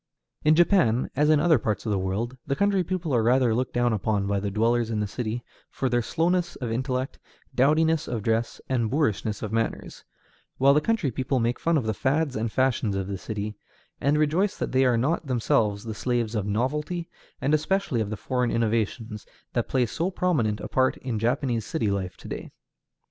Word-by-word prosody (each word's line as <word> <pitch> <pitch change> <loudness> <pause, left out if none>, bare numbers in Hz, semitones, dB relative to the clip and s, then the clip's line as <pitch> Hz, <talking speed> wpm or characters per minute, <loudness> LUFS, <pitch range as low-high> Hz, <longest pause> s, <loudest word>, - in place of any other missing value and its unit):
In 155 +1 +5
Japan, 170 - +3
as 150 +2 +3
in 155 -1 +5
other 160 -3 +4
parts 105 0 -2
of 110 - -1
the 100 - +1
world, 100 +7 -2
the 140 - 0
country 200 +2 +2
people 175 -4 -2
are 120 - +3
rather 120 0 +3
looked 125 +3 -1
down 120 -1 +2
upon 105 -1 0
by 100 0 0
the 100 +1 -2
dwellers 115 +3 +1
in 110 -2 -1
the 105 - 0
city 115 +3 -4 0.3
for 130 - -2
their 120 0 +2
slowness 175 +6 0
of 120 -4 -4
intellect, 130 +2 -2 0.3
dowdiness 155 +4 +3
of 115 -4 -3
dress, 115 +1 0
and 120 -4 0
boorishness 110 -7 0
of 105 - -3
manners; 115 0 -2 0.5
while 135 +1 +5
the 150 - +3
country 210 - 0
people 130 +2 -1
make 120 +1 0
fun 165 -1 +2
of 130 - -1
the 110 - 0
fads 145 +4 0
and 110 0 -2
fashions 125 -5 +1
of 95 -1 -1
the 100 -1 -3
city, 105 +1 -4 0.5
and 145 +3 +2
rejoice 160 +7 +1
that - - -3
they 130 0 +3
are 125 -2 +3
not 145 +6 0
themselves 110 -4 +1
the 115 -1 -5
slaves 120 0 -1
of 105 -3 -1
novelty, 150 - -1 0.3
and 140 +3 0
especially 155 - +1
of 105 - -2
the 110 - -4
foreign 125 +1 -1
innovations 110 -1 -1 0.3
that - - -1
play 130 -2 +2
so 165 - -2
prominent 150 - 0
a - - -5
part 130 0 +1
in 120 -5 -3
Japanese 120 0 0
city 110 -5 -1
life 95 -2 -3
to - - -11
day. - - -6
125 Hz, 205 wpm, -26 LUFS, 110-150 Hz, 0.5 s, In